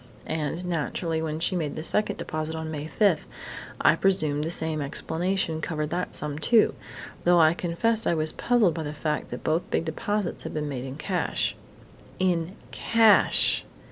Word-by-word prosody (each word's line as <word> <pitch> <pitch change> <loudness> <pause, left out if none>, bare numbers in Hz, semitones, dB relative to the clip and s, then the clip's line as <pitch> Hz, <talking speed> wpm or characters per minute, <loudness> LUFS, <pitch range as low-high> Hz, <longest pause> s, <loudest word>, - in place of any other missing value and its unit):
And, 160 +3 -3
naturally, 165 -1 -2
when 155 -1 -3
she 180 +3 +1
made 155 -5 -2
the 155 - -5
second 210 +5 +1
deposit 155 +1 -4
on 160 0 -4
May 150 -1 -5
5, 190 -2 +2 0.5
I - - +5
presumed 155 -7 +2
the 160 - -2
same 160 -2 -1
explanation 160 +3 -1
covered 155 -2 -3
that 180 +1 -2
sum, 150 0 -3
too, 225 +6 +4 0.5
though 175 0 +5
I 160 0 +6
confess 200 +7 0
I 170 - +2
was 155 0 +1
puzzled 230 -8 +2
by 165 - -4
the 150 -1 -4
fact 150 -1 -2
that 125 - -7
both 160 +3 0
big - - 0
deposits 200 +4 -1
had - - -7
been 150 -1 -2
made 130 -3 -4
in 130 0 -6
cash." 180 +4 -1 0.6
_In 180 -1 0 0.2
cash! 225 -2 +4
160 Hz, 170 wpm, -26 LUFS, 155-180 Hz, 0.6 s, I